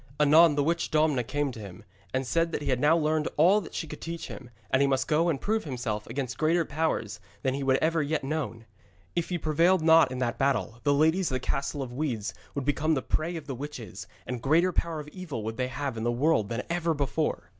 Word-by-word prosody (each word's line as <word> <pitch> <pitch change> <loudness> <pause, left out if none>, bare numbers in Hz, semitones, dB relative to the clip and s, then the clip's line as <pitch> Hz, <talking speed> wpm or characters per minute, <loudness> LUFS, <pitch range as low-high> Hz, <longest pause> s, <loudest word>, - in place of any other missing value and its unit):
Anon 150 +1 +6
the 145 - +2
witch 170 +3 0
Domna 155 -5 +2
came 145 +3 -1
to 120 - -10
him, 95 -4 -10 0.3
and 130 +1 -1
said 165 +5 +1
that 150 - -3
he - - 0
had 125 - +1
now 150 +5 +4
learned 155 -1 +1
all 185 +7 +5
that 165 - -10
she - - -2
could 150 -1 -9
teach 165 0 -5
him, 125 -2 -9 0.2
and 130 - +3
he 140 - +4
must 135 -1 +1
go 165 +3 +2
and 145 -5 0
prove 220 +6 0
himself 120 -7 -4
against 125 -1 -4
greater 165 +2 +2
powers 145 -9 -2 0.2
than 130 - +1
he 140 - -3
had 135 0 +3
ever 165 0 +2
yet 150 0 -1
known. 135 -6 -3 0.5
If 170 - -1
he 180 - -1
prevailed 165 +3 +2
not 160 -4 +6
in 130 - -4
that 125 -1 -2
battle, 135 -4 0
the 145 - +2
ladies 160 +5 +3
of 130 - -2
the - - 0
Castle 140 +2 -2
of 120 -2 -8
Weeds 125 -7 -2 0.2
would 140 -2 -2
become 155 +2 +1
the 130 - -2
prey 165 +3 -1
of 160 -3 -6
the 140 - -4
witches, 120 -8 -7 0.2
and 125 -2 -4
greater 165 +7 +3
power 165 -2 -1
of 150 - -8
evil 155 - -6
would 110 +1 -4
they 125 -1 0
have 135 +1 -4
in 110 - -3
the 120 - +1
world 120 -4 +2
than 120 +2 -3
ever 170 -1 0
before. 145 - -2
145 Hz, 240 wpm, -28 LUFS, 130-160 Hz, 0.5 s, Anon